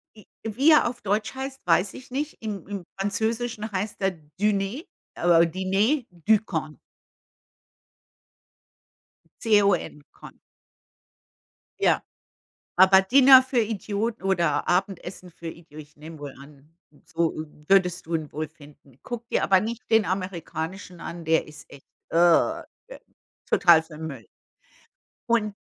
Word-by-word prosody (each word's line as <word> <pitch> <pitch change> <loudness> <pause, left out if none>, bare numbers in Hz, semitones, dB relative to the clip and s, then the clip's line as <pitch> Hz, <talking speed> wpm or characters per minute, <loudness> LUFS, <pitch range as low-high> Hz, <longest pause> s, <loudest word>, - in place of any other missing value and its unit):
J 215 - -17 0.2
wie 250 +8 +3
er 305 - +5
auf 240 0 -6
Deutsch 210 +3 -1
heißt, 265 0 -6
weiß 180 +3 +2
ich 260 0 -12
nicht, 290 +4 -3
im 205 -6 -6
im 200 -2 -5 0.2
Französischen 220 +2 -2
heißt 200 +2 -3
der 195 0 +1 0.3
Diner 210 +6 0 0.3
äh 170 -1 +4
„Dîner 195 - 0
de 180 +5 +3
Cons.“ 160 -7 -5 2.6
C 215 -3 +4
O 200 0 +4
N, 150 -3 -8
Con. - - -14 1.4
Ja. - - +3 0.7
Aber 190 +1 +7
Dinner 260 +5 +7
für 260 -1 0
Idioten 215 0 -2
oder 170 -6 +1
Abendessen 185 0 -2
für 170 0 -10
Idi 165 -2 -11
ich 150 -1 -12
nehme 155 +1 -11
wohl 145 -2 -7
an, 145 +2 -17 0.3
so 165 0 -1 0.3
würdest 180 -3 +3
du 165 +1 -2
ihn 155 -2 -4
wohl 155 +1 -4
finden. 145 -4 -19
Guck 240 -1 -6
dir - - 0
aber 190 -1 +4
nicht 230 +4 -5
den 220 -1 +4
amerikanischen 180 -1 -5
an, 170 -1 -7
der 160 0 +2
ist 150 -1 -13
echt, 140 - -15 0.2
äh, 175 - +3 0.9
total 170 -3 +5
für 160 -1 -13
'n 160 +1 -6
Müll. 135 -7 -9 1.0
Und 225 -4 +1
190 Hz, 135 wpm, -25 LUFS, 165-220 Hz, 2.6 s, Aber